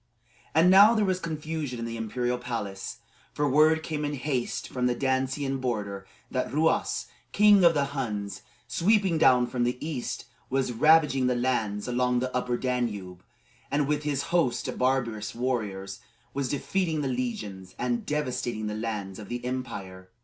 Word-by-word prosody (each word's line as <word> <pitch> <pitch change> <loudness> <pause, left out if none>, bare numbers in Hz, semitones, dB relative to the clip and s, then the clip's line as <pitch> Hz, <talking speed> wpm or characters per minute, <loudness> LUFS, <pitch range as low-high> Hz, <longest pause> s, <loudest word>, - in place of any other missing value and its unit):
And 165 +3 +6
now 205 +4 +8
there 215 -2 +2
was 185 -1 0
confusion 155 -5 -4
in 115 - -4
the 115 0 -4
imperial 120 +2 -2
palace; 110 -6 -5 0.3
for 145 0 +1
word 155 +3 +4
came 150 -2 -3
in 145 0 -1
haste 130 -2 -2
from 125 -1 -1
the 125 - +1
Dacian 135 +1 0
border 100 -6 -3 0.2
that 130 - -1
Ruas, 160 +4 +1 0.3
king 205 -2 +6
of 170 -2 +6
the 140 -1 +2
Huns, 105 -7 -3 0.3
sweeping 195 -3 +2
down 125 -5 +5
from 120 0 -2
the 125 +1 0
east, 150 -6 -4 0.2
was 130 -1 0
ravaging 140 0 +4
the 125 - +2
lands 115 -5 -1
along 125 0 +1
the 125 +1 -2
Upper 125 -1 0
Danube, 105 -9 -3 0.5
and 145 0 +1
with 150 0 0
his 145 -2 -1
host 130 -9 +2
of - - -5
barbarous 120 -5 0
warriors 105 -6 -2 0.3
was 135 -2 -2
defeating 160 +2 -1
the 140 - -1
legions 105 -7 -4
and 120 -1 -1
devastating 125 -6 -2
the 105 - -2
lands 105 -3 -4
of 105 - -9
the 120 0 -4
empire. 95 -8 -5
125 Hz, 165 wpm, -27 LUFS, 115-150 Hz, 0.5 s, now